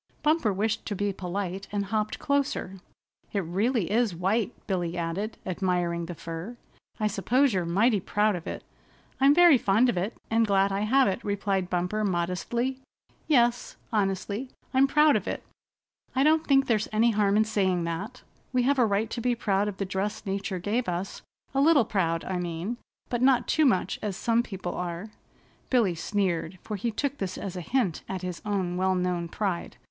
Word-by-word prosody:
Bumper 300 -7 +3
wished 215 +3 -1
to 205 - -2
be 205 +1 -1
polite 190 +1 -4
and 205 -1 -1
hopped 215 +1 -1
closer. 280 -10 -1 0.5
"It 200 - +1
really 195 +4 0
is 225 -4 +2
white," 200 +6 0
Billy 175 -3 -2
added, 175 +6 -3
admiring 175 -2 -1
the 175 - -6
fur. 165 +9 -7 0.4
"I 215 - 0
suppose 240 +6 +2
you're 185 -2 0
mighty 205 +5 +3
proud 205 +2 +1
of 170 - -7
it." - - -5 0.6
"I'm 275 +2 +6
very 345 -6 +7
fond 220 +6 +3
of 205 - -1
it, 195 +6 -2
and 225 0 +3
glad 195 0 +3
I 195 - -1
have 260 +6 +3
it," 195 +4 -2
replied 195 -2 -1
Bumper 180 +4 -1
modestly. 200 +8 -1 0.5
"Yes," 240 -5 +2 0.2
honestly, 205 +4 -1 0.2
"I'm 265 +1 +5
proud 300 +1 +5
of - - -1
it. - - -3 0.7
I 265 - +3
don't 315 +2 +3
think 270 -1 +5
there's 220 -4 +1
any 225 +2 +3
harm 205 -1 +2
in 215 - +4
saying 190 -5 +1
that. 195 +9 -5 0.3
We 250 -1 +2
have 275 +2 +2
a 245 - +5
right 210 +2 0
to 235 - -3
be 245 0 +1
proud 205 -3 +1
of 205 -2 -4
the 195 - -2
dress 195 +3 -3
nature 195 -1 -2
gave 205 +5 -1
us 180 +2 -4 0.3
a 275 - +2
little 290 -5 +5
proud, 165 -5 0
I 185 - -2
mean, 175 +6 -3 0.3
but 240 -1 -1
not 260 -1 +4
too 310 -2 +3
much 190 -6 +1
as 205 -3 -3
some 230 +1 +2
people 190 -6 -5
are." 180 +4 -5 0.6
Billy 230 -8 +3
sneered, 185 -1 -1
for 215 - -4
he 220 +4 -2
took 280 +5 -2
this 195 -2 -3
as 190 -2 -5
a 180 - -4
hint 205 -3 0
at 190 -1 -4
his 180 -2 -5
own 190 -4 -1
well 185 0 +2
known 180 -1 -1
pride. 185 -1 -3
205 Hz, 185 wpm, -27 LUFS, 185-235 Hz, 0.7 s, very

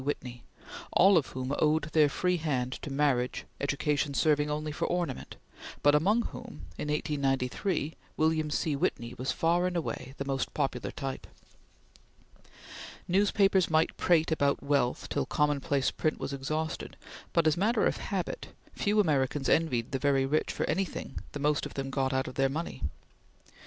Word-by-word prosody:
Whitney; 125 -4 -4 0.5
all 195 +1 +6
of 160 -6 +3
whom 130 +1 -4
owed 155 +1 +3
their 150 -2 +5
free 180 +5 +1
hand 130 -6 -1
to 145 - -6
marriage, 135 -3 +1
education 145 0 0
serving 150 -1 +3
only 150 +1 -2
for 150 - -2
ornament, 175 -7 -3 0.5
but 145 - +6
among 200 +10 +3
whom, 240 0 -8
in - - -4
1893, 150 +2 -1 0.2
William 155 -1 +2
C. 150 0 0
Whitney 120 -3 -1
was 130 - 0
far 175 +2 +2
and 180 -1 -2
away 135 -4 -4
the 140 - -3
most 135 -1 -2
popular 135 -4 -1
type. 135 -1 -5 1.8
Newspapers 195 0 +3
might 160 0 +2
prate 165 -2 +3
about 140 -3 +1
wealth 140 -3 +1
till - - -1
commonplace 145 -1 +1
print 155 - -1
was 140 - -4
exhausted, 155 +4 -3 0.3
but 170 - +2
as 155 -1 +4
matter 215 +7 +2
of - - +1
habit, - - -3 0.3
few 210 +1 +1
Americans 145 -6 +1
envied 125 -8 +2
the 135 - -1
very 135 -1 +2
rich 150 +3 0
for - - -2
anything 190 +1 -2
the 145 - -4
most 150 0 +1
of - - -14
them 135 -1 -3
got 135 -1 0
out 130 0 0
of 135 +1 0
money. 150 - -4
150 Hz, 155 wpm, -30 LUFS, 135-160 Hz, 1.8 s, all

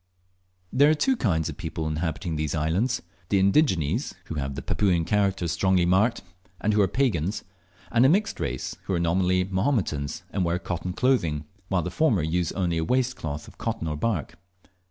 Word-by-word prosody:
There 140 +3 +6
are 155 - +4
two 265 - +2
kinds 80 - 0
of - - -6
people 80 - -4
inhabiting 80 +1 -2
these 75 +1 -1
islands 90 +12 0 0.3
the 100 - +3
indigenes, 95 - +2
who - - -6
have 70 -3 -3
the - - -5
Papuan 90 -5 +1
characters 100 -4 +1
strongly 90 +1 +2
marked, 105 +7 +2 0.4
and 105 - +1
who 105 - +4
are 100 - +4
pagans; 100 - 0 0.5
and 120 +1 +4
a 130 - +6
mixed 200 +6 +1
race, - - -3
who 95 - -1
are - - 0
nominally 90 +2 +2
Mahometans, 95 - -1
and 95 - 0
wear 85 0 +1
cotton 90 0 -4
clothing, 85 - +1 0.2
while 90 -3 0
the 90 - -4
former 110 - +2
use 85 +1 0
only 85 -4 0
a - - 0
waist 125 +5 +1
cloth 75 -1 -5
of - - -16
cotton 80 - -2
or 75 - -2
bark. 85 -3 -2
90 Hz, 185 wpm, -26 LUFS, 80-110 Hz, 0.5 s, There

